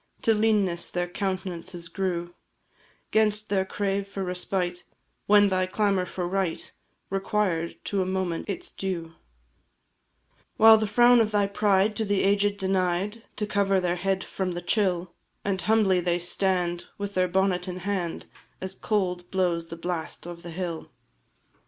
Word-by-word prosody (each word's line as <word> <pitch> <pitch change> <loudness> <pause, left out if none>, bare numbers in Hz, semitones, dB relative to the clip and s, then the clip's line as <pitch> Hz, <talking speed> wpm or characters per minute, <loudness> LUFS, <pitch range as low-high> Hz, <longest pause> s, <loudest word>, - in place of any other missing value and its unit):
To 225 - +5
leanness 210 -5 +1
their 175 0 -1
countenances 185 -2 -4
grew 175 -1 -2 0.8
'Gainst 215 -1 +2
their 190 -1 +1
crave 200 0 -1
for 200 -1 -4
respite, 180 -1 -2 0.4
when 205 0 +6
thy 185 -1 +1
clamour 195 -2 +1
for 180 0 -3
right 190 -2 -1 0.4
Required, 195 -4 0
to 200 -2 0
a - - 0
moment, 185 -3 -2
its 360 0 -5
due; 170 -4 -4 1.4
While 220 0 +8
the 215 - 0
frown 240 +3 +6
of 215 - +2
thy 205 -1 +2
pride 200 0 +2
to 220 - 0
the 200 -1 +1
aged 200 +1 +2
denied 190 +3 0
To 210 - -2
cover 200 -2 +2
their 180 -1 0
head 190 +1 0
from 185 -2 -3
the 175 - -4
chill, 180 -3 +1 0.3
And 190 -2 0
humbly 210 -4 +3
they 175 0 +1
stand, 175 0 0
with 200 0 -4
their 185 -1 +2
bonnet 185 0 +1
in 180 0 -5
hand, 185 -5 -2 0.3
As 190 0 -5
cold 180 -4 -1
blows 175 -3 0
the 165 - -7
blast 165 -1 -4
of 175 -1 -8
the 170 - -8
hill. 170 -1 -4
190 Hz, 150 wpm, -26 LUFS, 175-205 Hz, 1.4 s, While